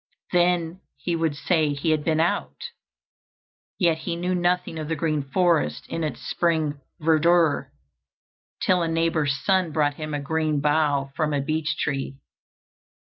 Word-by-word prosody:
Then 175 0 +1 0.2
he 175 - -2
would 165 -3 0
say 155 -1 +1
he 150 +3 0
had 155 -1 +1
been 160 -1 +1
out, 175 - -1 1.1
yet 170 -4 +2
he 170 +1 -3
knew 180 +2 -1
nothing 175 -2 0
of 155 - -4
the 160 - -1
green 155 -1 0
forest 140 - +1
in 165 - -3
its 155 - -4
spring 155 -4 0 0.2
verdure, 160 0 +3 0.9
till 180 -1 +3
a 165 - 0
neighbor's 165 -4 +1
son 185 -4 +2
brought 145 -1 +1
him 155 -1 -4
a - - -2
green 155 +1 0
bough 145 -2 +1
from 150 -2 0
a - - +1
beech 155 +2 -1
tree. 135 -1 -2
160 Hz, 150 wpm, -24 LUFS, 150-170 Hz, 1.1 s, verdure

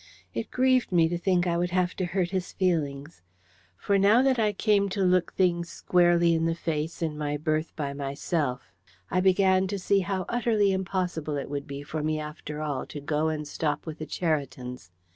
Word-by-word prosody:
It 115 - -4
grieved 255 -2 +2
me 170 -2 +4
to 175 - -1
think 180 -1 +2
I 170 -1 +1
would 175 0 0
have 180 0 0
to 185 - 0
hurt 175 0 -1
his 185 -2 -3
feelings. 150 - -1 0.6
For 200 -1 +1
now 210 +6 +5
that 265 -2 +2
I 215 -2 +3
came 205 -1 +2
to 195 0 -1
look 180 -1 +2
things 170 -2 +1
squarely 175 -1 +3
in 165 0 +1
the 165 0 +1
face 160 0 -3
in 155 -2 -2
my 150 -1 -2
berth 155 +1 -1
by 140 -3 -3
myself, 140 -1 -3 0.4
I - - +2
began 190 0 +4
to 200 +1 -3
see 195 +1 +2
how 190 -1 -2
utterly 220 -4 +2
impossible 180 -5 -2
it 140 - -5
would 140 -1 -4
be 140 0 -6
for 155 +2 -4
me 155 0 -1
after 150 0 -6
all 145 -4 -3
to 150 - -7
go 150 +2 0
and 155 -1 -2
stop 150 0 -2
with 160 -1 -7
the 155 - -5
Cheritons. 130 - -3
170 Hz, 200 wpm, -27 LUFS, 150-190 Hz, 0.6 s, now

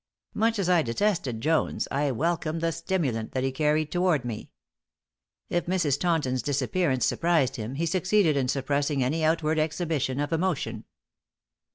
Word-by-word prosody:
Much 225 +1 +1
as 195 -3 0
I 180 -2 +4
detested 130 - -1
Jones, 160 +3 0
I 145 +1 +1
welcomed 160 +4 -1
the 165 0 +1
stimulant 160 - -2
that 130 - -1
he 135 - 0
carried 150 +2 +1
toward 175 -7 +1
me. 115 -3 -5 1.0
If 175 -1 -1
Mrs. 170 -7 +1
Taunton's 150 -8 0
disappearance 140 0 0
surprised 160 -7 +1
him, 115 +3 -5
he 165 +4 -1
succeeded 185 -1 +2
in 135 -2 +1
suppressing 140 +1 0
any 155 +6 0
outward 155 0 +1
exhibition 155 -4 -1
of 145 +2 -1
emotion. 170 -1 -1
155 Hz, 150 wpm, -26 LUFS, 135-170 Hz, 1.0 s, I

